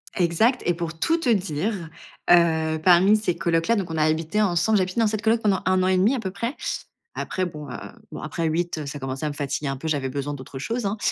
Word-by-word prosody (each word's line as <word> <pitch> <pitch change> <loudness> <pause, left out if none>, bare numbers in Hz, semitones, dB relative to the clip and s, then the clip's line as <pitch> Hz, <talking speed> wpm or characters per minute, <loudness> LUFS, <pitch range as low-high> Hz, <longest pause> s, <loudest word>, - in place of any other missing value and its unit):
Exact 200 +8 +2
et 175 - +3
pour 165 -1 -5
tout 330 - +2
te 325 -7 -1
dire, 190 -2 -1 0.4
heu, 160 -2 +4
parmi 185 +4 +6
ces 210 -5 0
colocs-là, 170 +5 +1
donc 190 -6 -2
on 160 - -3
a 155 - +3
habité 160 +6 +1
ensemble. 205 +2 +2
J'ai - - +3
habité 185 +4 -3
dans 225 - +4
cette 215 0 -2
coloc 225 +1 +2
pendant 200 -3 +2
1 185 0 +3
an - - +2
et 185 0 +3
1/2 210 +9 +3
à - - -2
peu 190 -4 -4
près. 230 +8 -3 0.6
Après, 185 - -2
bon, 150 -5 -7
heu, - - -5 0.3
bon, - - -7
après 165 -1 -2
8, 170 +1 -1
heu, 150 - -5
ça 145 +1 -6
commençait 135 +2 -4
à - - 0
me - - -5
fatiguer 145 0 -3
un 135 - -2
peu. 160 - -6
J'avais 140 -4 -1
besoin 140 +2 -3
d'autre 135 -1 -9
chose, 225 - -3
hein, 200 +2 -1
175 Hz, 255 wpm, -24 LUFS, 155-210 Hz, 0.6 s, parmi